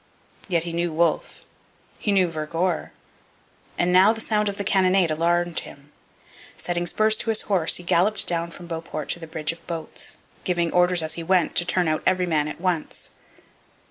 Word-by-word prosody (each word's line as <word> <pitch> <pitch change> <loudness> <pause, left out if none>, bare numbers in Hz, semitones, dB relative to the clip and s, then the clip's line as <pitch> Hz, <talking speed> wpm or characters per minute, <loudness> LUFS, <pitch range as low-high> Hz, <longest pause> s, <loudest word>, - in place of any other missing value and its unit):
Yet 170 -4 +1
he 170 -1 -5
knew 170 0 -1
Wolfe; 165 0 -1 0.5
he 210 - 0
knew 190 -2 +3
Vergor; 165 +2 -2 0.9
and 175 +1 +1
now 190 +4 +7
the 225 - -4
sound 210 -2 0
of 200 - -5
the 200 - -2
cannonade 185 -3 +3
alarmed 170 +2 +1
him. 140 +1 -13 0.7
Setting 175 0 -2
spurs 215 +5 +2
to - - -3
his 220 - +4
horse, 185 -6 +2
he 175 - -4
galloped 180 +5 +2
down 170 -1 +1
from 175 +1 -11
Beauport 165 -3 -6
to - - 0
the 165 - -9
bridge 155 0 -2
of 165 - -14
boats, 165 -2 -5 0.3
giving 175 -2 0
orders 180 -1 +3
as 155 0 -2
he 170 - -5
went 180 0 +2
to 175 - +2
turn 180 -1 +1
out 155 0 0
every 185 -1 +2
man 155 -3 +1
at 150 - -7
once. 180 -3 -3
175 Hz, 185 wpm, -24 LUFS, 165-185 Hz, 0.9 s, now